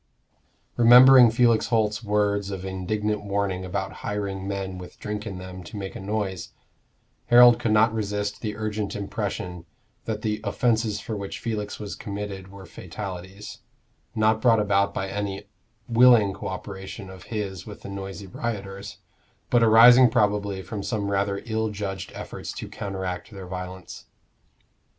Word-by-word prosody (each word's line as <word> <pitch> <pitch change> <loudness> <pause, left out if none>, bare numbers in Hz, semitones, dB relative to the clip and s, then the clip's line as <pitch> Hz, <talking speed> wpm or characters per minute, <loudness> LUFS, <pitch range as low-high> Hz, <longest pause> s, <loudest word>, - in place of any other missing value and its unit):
Remembering 125 +1 +9
Felix 115 0 +3
Holt's 110 -2 0
words 100 -1 0
of 95 -1 -5
indignant 105 +3 -2
warning 100 -2 -1
about 95 +1 -4
hiring 100 -2 -3
men 95 -2 -4
with 90 - -11
drink 105 0 -5
in 95 -3 -6
them 90 0 -8
to 110 - -9
make 95 -1 -6
a - - -6
noise, 95 -2 -3 0.7
Harold 120 0 +8
could 115 - -1
not 110 +1 +4
resist 105 -1 -3
the 105 -2 -3
urgent 105 -1 -3
impression 90 -3 -4 0.4
that 110 -1 -4
the 105 -1 -1
offences 110 -3 0
for 110 - -5
which 100 -1 -5
Felix 105 -3 -4
was 105 -2 -6
committed 100 -2 -6
were 95 0 -12
fatalities, 95 +3 -8 0.6
not 110 0 +2
brought 115 -2 +5
about 100 -1 +2
by 95 -1 -3
any 100 0 -4 0.4
willing 115 -4 +5
co - - -7
operation 95 +1 -7
of 95 -1 -12
his 100 -5 -5
with 105 - -10
the - - -7
noisy 100 0 -7
rioters, 100 -1 -5 0.5
but 120 - +4
arising 120 +3 +8
probably 100 -3 0
from 105 0 -5
some 100 -1 -2
rather 100 0 -1
ill 110 -1 -1
judged 100 -2 -5
efforts - - -7
to - - -7
counteract 95 -3 -5
their 100 -4 -9
violence. 90 0 -8
100 Hz, 150 wpm, -25 LUFS, 95-110 Hz, 0.7 s, Remembering